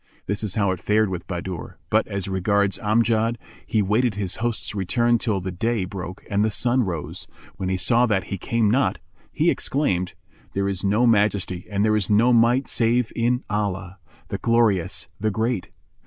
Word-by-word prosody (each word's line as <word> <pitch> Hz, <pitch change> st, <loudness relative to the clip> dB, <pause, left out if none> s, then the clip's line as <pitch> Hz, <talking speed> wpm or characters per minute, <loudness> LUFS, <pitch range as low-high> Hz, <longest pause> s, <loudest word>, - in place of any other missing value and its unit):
This 100 Hz, +2 st, -2 dB
is 105 Hz, -3 st, -2 dB
how 100 Hz, -3 st, +2 dB
it 95 Hz, -, -3 dB
fared 105 Hz, +2 st, +2 dB
with 90 Hz, -2 st, -5 dB
Bahadur; 90 Hz, -1 st, -5 dB
but -, -, +3 dB
as 100 Hz, -1 st, -3 dB
regards 100 Hz, +1 st, +1 dB
Amjad, 115 Hz, +1 st, +2 dB, 0.3 s
he 110 Hz, -, +2 dB
awaited 105 Hz, +3 st, +1 dB
his 100 Hz, -3 st, -2 dB
host's 115 Hz, -2 st, -2 dB
return 115 Hz, +5 st, +1 dB
till 110 Hz, -5 st, 0 dB
the 95 Hz, 0 st, -4 dB
day 110 Hz, +2 st, -1 dB
broke 90 Hz, -1 st, -7 dB
and 100 Hz, 0 st, +1 dB
the 110 Hz, -, +2 dB
sun 120 Hz, +5 st, +1 dB
rose, 85 Hz, -9 st, -4 dB
and -, -, -23 dB
when 95 Hz, -, -2 dB
he 95 Hz, -, 0 dB
saw 120 Hz, +5 st, +3 dB
that 100 Hz, -4 st, +1 dB
he 100 Hz, -, -5 dB
came 115 Hz, 0 st, +1 dB
not, 125 Hz, -6 st, +2 dB, 0.3 s
he -, -, +2 dB
exclaimed, 95 Hz, -11 st, -1 dB, 0.4 s
"There 100 Hz, 0 st, 0 dB
is 95 Hz, -1 st, -3 dB
no 105 Hz, +5 st, +3 dB
Majesty 100 Hz, -5 st, +1 dB
and 100 Hz, 0 st, +1 dB
there 110 Hz, 0 st, +3 dB
is 105 Hz, -3 st, 0 dB
no 115 Hz, +4 st, +4 dB
Might 120 Hz, +3 st, +4 dB
save 115 Hz, 0 st, +1 dB
in 125 Hz, +2 st, +1 dB
Allah, 95 Hz, -3 st, -3 dB, 0.3 s
the -, -, -3 dB
Glorious, 115 Hz, -6 st, +1 dB
the 110 Hz, -, +1 dB
Great! 110 Hz, -1 st, -1 dB
105 Hz, 185 wpm, -23 LUFS, 95-115 Hz, 0.4 s, no